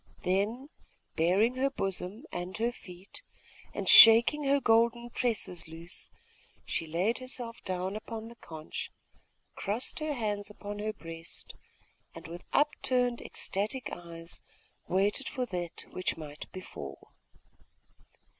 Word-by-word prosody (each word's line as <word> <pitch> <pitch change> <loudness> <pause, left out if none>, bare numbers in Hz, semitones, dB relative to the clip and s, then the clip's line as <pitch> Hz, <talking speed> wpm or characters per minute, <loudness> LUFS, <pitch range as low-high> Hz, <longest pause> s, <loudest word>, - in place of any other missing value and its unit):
Then, 210 +9 0 0.5
baring 200 +10 +3
her 270 +1 +3
bosom 195 -1 -3
and 175 +2 -4
her 230 +2 +1
feet, 185 - -12 0.5
and - - -4
shaking 235 +6 +10
her 280 +1 +4
golden 235 0 +3
tresses 215 -10 -1
loose, 165 +2 -7 0.6
she 165 - -1
laid 180 +9 +1
herself 250 -2 -7
down 185 +1 -2
upon 220 +1 -6
the 235 - -11
conch, 160 -6 -6 0.6
crossed 215 +10 -1
her 310 -1 -1
hands 210 -4 -2
upon 205 0 -7
her 215 +1 -1
breast, 165 -4 -9 0.6
and, - - -9
with 170 +2 -8
upturned 250 -4 +2
ecstatic 215 +5 -3
eyes, 170 -1 -6 0.5
waited 200 +8 +1
for 255 -3 -2
that 175 -6 -5
which 185 - -1
might 150 -2 -8
befall. 70 - -9
205 Hz, 120 wpm, -31 LUFS, 175-240 Hz, 0.6 s, shaking